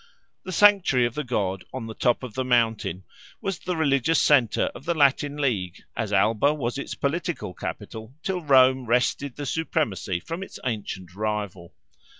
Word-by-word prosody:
The 185 Hz, -, -5 dB
sanctuary 185 Hz, -10 st, +5 dB
of 120 Hz, -, -2 dB
the 150 Hz, -, -3 dB
god 95 Hz, -7 st, -2 dB
on 130 Hz, -3 st, -5 dB
the 110 Hz, -, -6 dB
top 120 Hz, +3 st, +1 dB
of 125 Hz, -4 st, -6 dB
the 130 Hz, -, -1 dB
mountain 115 Hz, -7 st, +1 dB, 0.4 s
was 195 Hz, -3 st, -3 dB
the 180 Hz, -2 st, -3 dB
religious 145 Hz, 0 st, +2 dB
centre 130 Hz, -7 st, +3 dB
of -, -, -11 dB
the 170 Hz, -, 0 dB
Latin 145 Hz, 0 st, +2 dB
League, 100 Hz, -11 st, -2 dB
as 110 Hz, -2 st, -3 dB
Alba 110 Hz, +8 st, +3 dB
was 130 Hz, -2 st, -3 dB
its -, -, -5 dB
political 150 Hz, -, -2 dB
capital 110 Hz, +6 st, -7 dB
till 185 Hz, -2 st, -2 dB
Rome 130 Hz, -3 st, +4 dB
wrested 125 Hz, +3 st, +1 dB
the 145 Hz, -, -5 dB
supremacy 130 Hz, -, -1 dB
from 165 Hz, -, -6 dB
its 195 Hz, -, -8 dB
ancient 100 Hz, -6 st, -4 dB
rival. 100 Hz, -4 st, -4 dB
125 Hz, 165 wpm, -25 LUFS, 110-150 Hz, 0.4 s, sanctuary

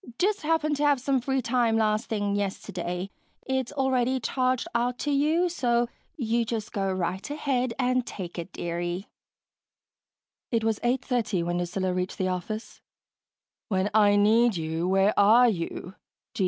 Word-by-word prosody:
"Just 410 Hz, +2 st, +1 dB
happened 305 Hz, -1 st, +1 dB
to 295 Hz, -, -1 dB
have 290 Hz, -2 st, +4 dB
some 265 Hz, 0 st, +1 dB
free 265 Hz, +1 st, -1 dB
time 235 Hz, -1 st, +2 dB
last 215 Hz, +1 st, +1 dB
thing 205 Hz, -2 st, -1 dB
yesterday. 190 Hz, -2 st, -3 dB, 0.3 s
It's 265 Hz, -2 st, -1 dB
already 260 Hz, -2 st, +1 dB
charged 255 Hz, +1 st, 0 dB
out 240 Hz, +1 st, 0 dB
to 295 Hz, -, 0 dB
you, 310 Hz, +5 st, +2 dB
so 240 Hz, -8 st, +1 dB, 0.3 s
you 235 Hz, -3 st, +1 dB
just 225 Hz, -2 st, -4 dB
go 195 Hz, -3 st, 0 dB
right 185 Hz, +3 st, -3 dB
ahead 260 Hz, -5 st, -1 dB
and 255 Hz, 0 st, +1 dB
take 180 Hz, -6 st, -7 dB
it, 170 Hz, -, -6 dB
dearie." 175 Hz, +2 st, -3 dB, 1.4 s
It 230 Hz, -2 st, 0 dB
was 220 Hz, -1 st, 0 dB
8:30 240 Hz, -6 st, 0 dB
when 175 Hz, +1 st, -1 dB
Lucilla 180 Hz, +1 st, -1 dB
reached 180 Hz, +1 st, -3 dB
the 185 Hz, -1 st, 0 dB
office. 215 Hz, +5 st, -5 dB, 0.9 s
"When 190 Hz, 0 st, 0 dB
I 205 Hz, -1 st, +5 dB
need 220 Hz, +1 st, +4 dB
you, 160 Hz, +2 st, -2 dB
where 195 Hz, +2 st, +3 dB
are 225 Hz, +5 st, +7 dB
you?" 180 Hz, -1 st, -4 dB
225 Hz, 150 wpm, -27 LUFS, 190-255 Hz, 1.4 s, are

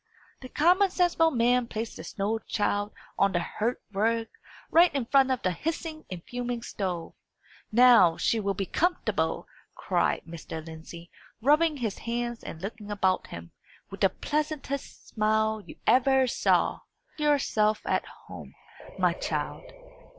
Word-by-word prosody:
The 255 Hz, -, -9 dB
common 360 Hz, +8 st, +4 dB
sensible 350 Hz, -3 st, +3 dB
man 245 Hz, -2 st, +2 dB
placed 225 Hz, 0 st, -5 dB
the -, -, -8 dB
snow 215 Hz, +2 st, -2 dB
child 205 Hz, -1 st, -1 dB, 0.3 s
on 200 Hz, -1 st, +3 dB
the 175 Hz, -, +2 dB
hearth 225 Hz, +7 st, -2 dB
rug, 225 Hz, +3 st, 0 dB, 0.4 s
right 345 Hz, +2 st, +6 dB
in 270 Hz, -4 st, 0 dB
front 270 Hz, +2 st, +4 dB
of 260 Hz, -2 st, -1 dB
the 185 Hz, -, +2 dB
hissing 315 Hz, -, -4 dB
and 180 Hz, -2 st, -7 dB
fuming 245 Hz, -1 st, -4 dB
stove. 180 Hz, -7 st, -4 dB, 0.6 s
"Now 230 Hz, -8 st, +6 dB
she 230 Hz, -, +1 dB
will 200 Hz, -2 st, -1 dB
be 195 Hz, -, -2 dB
comfortable!" 355 Hz, -, -1 dB, 0.3 s
cried -, -, 0 dB
Mr. 160 Hz, -1 st, -7 dB
Lindsey, 165 Hz, +1 st, -10 dB, 0.3 s
rubbing 300 Hz, +5 st, +3 dB
his 225 Hz, -6 st, -3 dB
hands 235 Hz, 0 st, -3 dB
and 160 Hz, -, -8 dB
looking 210 Hz, +1 st, -6 dB
about 190 Hz, -3 st, 0 dB
him, 85 Hz, 0 st, -9 dB, 0.4 s
with -, -, -9 dB
the -, -, +5 dB
pleasantest 295 Hz, -2 st, -4 dB
smile 220 Hz, 0 st, +1 dB
you -, -, -12 dB
ever 265 Hz, +2 st, +4 dB
saw. 250 Hz, -, +1 dB, 0.4 s
"Make 300 Hz, -, 0 dB
yourself 215 Hz, -7 st, +2 dB
at -, -, 0 dB, 0.2 s
home, -, -, -11 dB, 0.4 s
my -, -, +3 dB
child." -, -, -4 dB
230 Hz, 145 wpm, -27 LUFS, 200-275 Hz, 0.6 s, right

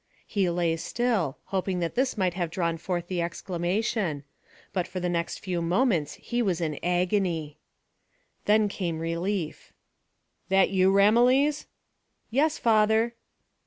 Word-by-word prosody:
He 195 Hz, -4 st, 0 dB
lay 170 Hz, -1 st, 0 dB
still, 200 Hz, -, -1 dB, 0.2 s
hoping 190 Hz, -1 st, 0 dB
that 170 Hz, -1 st, -2 dB
this 255 Hz, -1 st, 0 dB
might 185 Hz, -3 st, +1 dB
have 175 Hz, -2 st, -2 dB
drawn 170 Hz, -1 st, -1 dB
forth 175 Hz, 0 st, -3 dB
the 180 Hz, -2 st, -1 dB
exclamation, 175 Hz, -1 st, -2 dB, 0.5 s
but 180 Hz, -2 st, -1 dB
for 185 Hz, +1 st, -5 dB
the 180 Hz, -, -1 dB
next 170 Hz, -1 st, -2 dB
few 180 Hz, -3 st, -3 dB
moments 170 Hz, -, +1 dB
he 240 Hz, 0 st, -3 dB
was 185 Hz, -7 st, 0 dB
in 155 Hz, -4 st, -2 dB
agony. 175 Hz, -3 st, 0 dB, 0.9 s
Then 210 Hz, 0 st, +4 dB
came 175 Hz, -5 st, -3 dB
relief. 165 Hz, +1 st, -3 dB, 0.8 s
"That 195 Hz, 0 st, +4 dB
you, 190 Hz, 0 st, +4 dB
Ramillies?" 245 Hz, +9 st, +4 dB, 0.6 s
"Yes, 295 Hz, +6 st, +2 dB
father." 220 Hz, +1 st, +3 dB
185 Hz, 130 wpm, -27 LUFS, 170-215 Hz, 0.9 s, Then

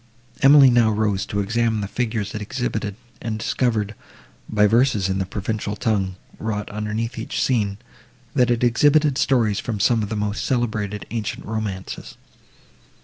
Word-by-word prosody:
Emily 140 Hz, -1 st, +8 dB
now 120 Hz, -2 st, +4 dB
rose 105 Hz, -3 st, 0 dB
to 100 Hz, -, -1 dB
examine 110 Hz, +1 st, 0 dB
the 100 Hz, -, -3 dB
figures 110 Hz, -2 st, -2 dB
it 110 Hz, -, -4 dB
exhibited, 110 Hz, -3 st, -3 dB, 0.3 s
and 115 Hz, -2 st, -3 dB
discovered, 110 Hz, -2 st, 0 dB, 0.6 s
by 105 Hz, -1 st, +3 dB
verses 110 Hz, -3 st, +3 dB
in 95 Hz, 0 st, 0 dB
the 95 Hz, -, -2 dB
Provençal 105 Hz, +1 st, -3 dB
tongue, 100 Hz, -4 st, 0 dB, 0.2 s
wrought 105 Hz, -1 st, -3 dB
underneath 105 Hz, +2 st, -3 dB
each 110 Hz, -, -4 dB
scene, 105 Hz, -6 st, +1 dB, 0.6 s
that 125 Hz, 0 st, +3 dB
it 120 Hz, 0 st, +1 dB
exhibited 145 Hz, +4 st, +4 dB
stories 115 Hz, -7 st, +2 dB
from 110 Hz, -4 st, -3 dB
some 115 Hz, +2 st, +3 dB
of 105 Hz, -, -3 dB
the 110 Hz, -, -2 dB
most 105 Hz, 0 st, -2 dB
celebrated 105 Hz, -5 st, -1 dB
ancient 110 Hz, -2 st, -4 dB
romances. 105 Hz, -4 st, -5 dB
110 Hz, 150 wpm, -22 LUFS, 105-120 Hz, 0.6 s, Emily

